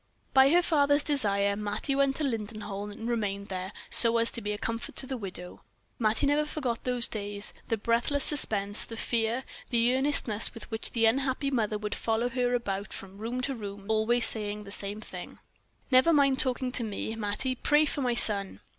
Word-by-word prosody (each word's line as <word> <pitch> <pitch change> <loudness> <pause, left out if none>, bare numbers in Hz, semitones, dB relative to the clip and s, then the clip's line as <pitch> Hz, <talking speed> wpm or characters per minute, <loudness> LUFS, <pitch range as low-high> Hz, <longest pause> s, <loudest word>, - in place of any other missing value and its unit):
By 265 0 +7
her 350 +4 +4
father's 290 -3 +3
desire, 200 -8 +1
Mattie 210 +6 -2
went 275 0 +2
to 310 - -1
Lindenholm, 210 -4 -4
and 225 +2 -7
remained 200 -4 -2
there, 185 0 -4 0.2
so 230 -1 +6
as 230 0 +2
to 235 - -6
be 210 - -3
a 210 - -3
comfort 230 +2 -4
to - - 0
the 265 - -4
widow. 185 -5 -7 0.4
Mattie 220 +4 +2
never 290 +2 +3
forgot 270 -6 -4
those 250 -2 +2
days, 205 -1 -4
the 225 - 0
breathless 235 +6 0
suspense, 205 -8 0
the 225 - -8
fear, 230 +2 0 0.3
the 240 +1 +2
earnestness 260 -6 +1
with 230 - -8
which 220 0 -5
the 230 -1 +2
unhappy 270 +4 +1
mother 215 -4 0
would 210 0 -4
follow 230 +2 0
her 245 0 0
about 200 -4 -3
from 195 +1 -10
room 235 +3 -3
to 270 +2 -2
room, 205 -4 -7
saying 195 - -16
always 225 +2 +4
the 210 -2 -5
same 205 +1 -5
thing: 180 -4 -9 0.5
"Never 260 +6 +6
mind 275 -3 +3
talking 255 0 +1
to 245 - +1
me, 220 +1 -4
Mattie; 220 +4 -1
pray 295 +4 +3
for 290 - -2
my 245 -2 0
son." 200 -4 +3
230 Hz, 190 wpm, -28 LUFS, 205-260 Hz, 0.5 s, By